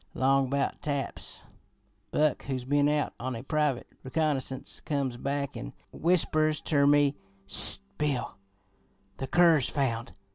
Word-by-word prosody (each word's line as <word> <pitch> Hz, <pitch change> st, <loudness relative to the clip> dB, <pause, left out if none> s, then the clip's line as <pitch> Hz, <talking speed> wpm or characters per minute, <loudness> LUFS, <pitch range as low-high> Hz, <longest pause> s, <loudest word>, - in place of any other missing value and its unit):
Long 135 Hz, 0 st, +2 dB
about 140 Hz, +1 st, -2 dB
taps, 140 Hz, -2 st, -3 dB, 0.7 s
Buck, 150 Hz, +2 st, 0 dB
who's 130 Hz, -3 st, -4 dB
been 145 Hz, +2 st, +2 dB
out 150 Hz, 0 st, 0 dB
on 130 Hz, +1 st, -4 dB
a 115 Hz, -, -7 dB
private 150 Hz, -3 st, 0 dB, 0.2 s
reconnoissance, 135 Hz, -2 st, -2 dB
comes 140 Hz, -4 st, -2 dB
back 140 Hz, +2 st, -3 dB
an' -, -, -7 dB, 0.2 s
whispers 155 Hz, -3 st, +1 dB
ter 140 Hz, -2 st, +2 dB
me: 145 Hz, -1 st, +4 dB, 0.3 s
'Ssst, -, -, +7 dB, 0.2 s
Bill! 140 Hz, -5 st, -1 dB, 0.8 s
The 135 Hz, -, -4 dB
cur's 165 Hz, -4 st, +4 dB
found! 125 Hz, -4 st, -2 dB
140 Hz, 130 wpm, -28 LUFS, 130-150 Hz, 0.8 s, Ssst